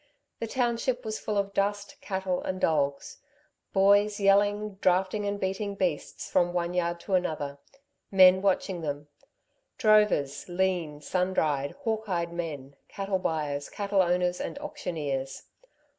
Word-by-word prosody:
The 230 - -3
township 245 +1 -1
was 215 0 -3
full 210 -1 -2
of 200 0 -1
dust, 205 +1 -2
cattle, 190 -2 -2
and 185 0 -3
dogs; 140 -4 0 0.5
boys, 205 +2 +4
yelling, 205 +1 +2
drafting 190 +3 +2
and 200 0 -2
beating 200 +2 -2
beasts 180 -6 -2
from 175 0 +2
one 175 0 -1
yard 170 -1 0
to 195 - -5
another, 155 -6 -1 0.5
men 185 -1 +7
watching 190 -2 0
them, 145 -1 -4 0.7
drovers, 210 - +3
lean, 175 -5 -1
sun 185 +4 -1
dried, 145 -2 0
hawk 220 -2 -2
eyed 170 -2 -1
men, 145 -5 -5
cattle 195 -1 -2
buyers, 150 -5 -2
cattle 200 -1 +1
owners 180 0 +1
and - - -5
auctioneers. 160 - -4
185 Hz, 135 wpm, -28 LUFS, 165-205 Hz, 0.7 s, men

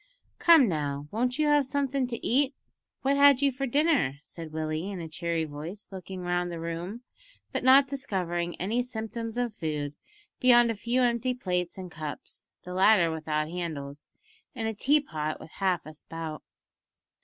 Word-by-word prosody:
"Come 325 -7 +7
now, 145 -4 -2
won't 250 +3 0
you 305 - +2
have 295 -1 +4
somethin' 275 -2 0
to 235 -2 -5
eat? 275 +2 +2 0.5
What 275 +1 +2
had 280 -1 +6
you 280 - +4
for 270 +2 -3
dinner?" 285 - +2
said 165 -1 -9
Willie, 155 +3 -2
in 195 -3 -5
a 165 - -5
cheery 165 0 -2
voice, 155 +7 -8
looking 190 -1 -7
round 175 0 -1
the 170 - -5
room, 170 +8 -5 0.5
but - - -2
not 265 +2 +7
discovering 180 -11 -2
any 220 +7 0
symptoms 230 -1 -5
of 245 -2 -1
food 150 -6 -3 0.5
beyond 240 -2 +6
a - - -3
few 235 +4 +1
empty 240 +1 +1
plates 180 -7 -2
and 185 -2 -7
cups 155 -2 -7
(the 180 - -7
latter 185 -2 +5
without 155 -1 -1
handles), 150 -5 -5 0.5
and 225 -3 -2
a 225 - -1
tea 285 +8 +3
pot 155 - -4
with 160 - -12
half 185 -3 0
a 155 - -9
spout. 160 0 -7
190 Hz, 170 wpm, -28 LUFS, 165-250 Hz, 0.5 s, Come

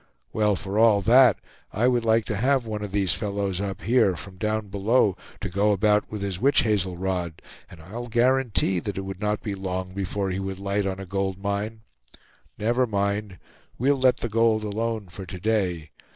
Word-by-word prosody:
Well, 105 -2 +2
for 100 +2 -3
all 110 -3 +5
that, 120 +1 +6 0.3
I 115 +5 +1
would 120 -2 +2
like 110 -1 +3
to 110 - -2
have 130 +4 +2
one 105 -1 -4
of 105 -2 -5
these 95 -3 +2
fellows 100 -3 -2
up 100 -4 -4
here, 105 -3 +3
from 95 +3 -10
down 110 0 -2
below, 100 0 +2 0.3
to 100 - -2
go 100 +3 +2
about 105 +1 +2
with 105 -2 -5
his 95 -2 -3
witch 140 +2 +4
hazel 95 -6 0
rod, 90 -3 -3 0.3
and 85 - -13
I'll 110 +9 -7
guarantee 120 -7 +2
that 100 +2 -5
it 95 - -3
would 95 -1 -7
not 105 0 -1
be 105 - -3
long 95 -1 -4
before 95 0 -2
he 95 - -2
would 95 -1 -4
light 100 0 -1
on 95 0 -3
a 95 - -6
gold 95 0 -2
mine. 100 +3 -3 0.8
Never 120 +4 +1
mind; 100 -2 -1 0.4
we'll 140 +4 +3
let 130 -1 +3
the - - -3
gold 115 -1 +2
alone 110 0 -2
for 90 +2 -9
to 90 +1 -7
day. 90 -7 -1
100 Hz, 195 wpm, -25 LUFS, 95-110 Hz, 0.8 s, that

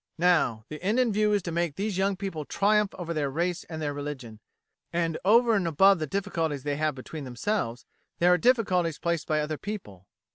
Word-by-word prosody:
Now, 160 -11 +2
the 155 - -8
end 210 +7 +1
in 245 -4 +2
view 210 +1 +2
is 205 -3 +1
to 170 - -4
make 170 -3 -1
these 205 +1 -2
young 195 0 +1
people 185 -5 -4
triumph 210 +5 +1
over 170 -2 -4
their 150 -3 -1
race 175 +5 -2
and 160 -2 -7
their 145 -2 -2
religion; 140 -6 -6 0.5
and 165 -2 -1
over 230 +4 +5
and 195 -5 +1
above 190 +4 +5
the 155 - -2
difficulties 160 -5 -2
they 145 -1 -2
have 155 -1 0
between 145 +3 -8
themselves, 125 - -2 0.3
there 180 +1 +5
are - - +4
difficulties 180 - +2
placed 170 -2 -2
by 155 -1 +1
other 150 0 -3
people. 105 - -7
170 Hz, 205 wpm, -27 LUFS, 150-195 Hz, 0.5 s, over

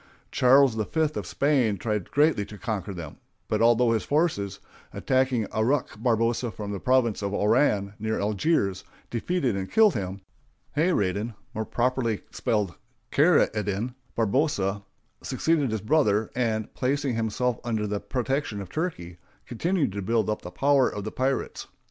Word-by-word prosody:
Charles 130 0 +5
V 110 -1 -1 0.3
of - - -5
Spain 130 -8 +1
tried 105 -4 -2
greatly 145 -7 +3
to 105 - -10
conquer 105 -2 -3
them; 85 -5 -8 0.3
but - - 0
although 120 +1 +4
his 110 -2 +1
forces, 120 - 0 0.3
attacking 130 -3 +1
Aruck 115 0 0
Barbarossa 115 +1 +1
from 105 0 -6
the 100 - -4
province 125 -3 +2
of 100 0 -2
Oran, 105 -2 +2
near 110 +1 -1
Algiers, 100 - 0 0.3
defeated 130 - 0
and 95 -1 -4
killed 220 -4 +5
him, 95 -1 -4 0.5
Hayradin 110 - 0 0.2
(more 110 +1 -3
properly 120 -3 0
spelled 105 -6 -1 0.4
Khair 160 +4 +5
ed 105 -2 -2
din) 105 +5 -2 0.2
Barbarossa 105 -4 +1 0.4
succeeded 160 -5 +1
his 110 -2 -2
brother, 110 -5 +2
and, 110 -3 -1
placing 140 0 0
himself 115 +2 -1
under 110 -3 -1
the 105 0 -2
protection 130 -3 -2
of 95 - -8
Turkey, 90 - -4 0.3
continued 165 - 0
to 100 +1 -4
build 110 +2 +1
up 105 - -3
the 90 - -7
power 135 +5 +3
of 105 - -6
the 110 - -4
pirates. 135 +1 -2
115 Hz, 150 wpm, -26 LUFS, 105-135 Hz, 0.5 s, Charles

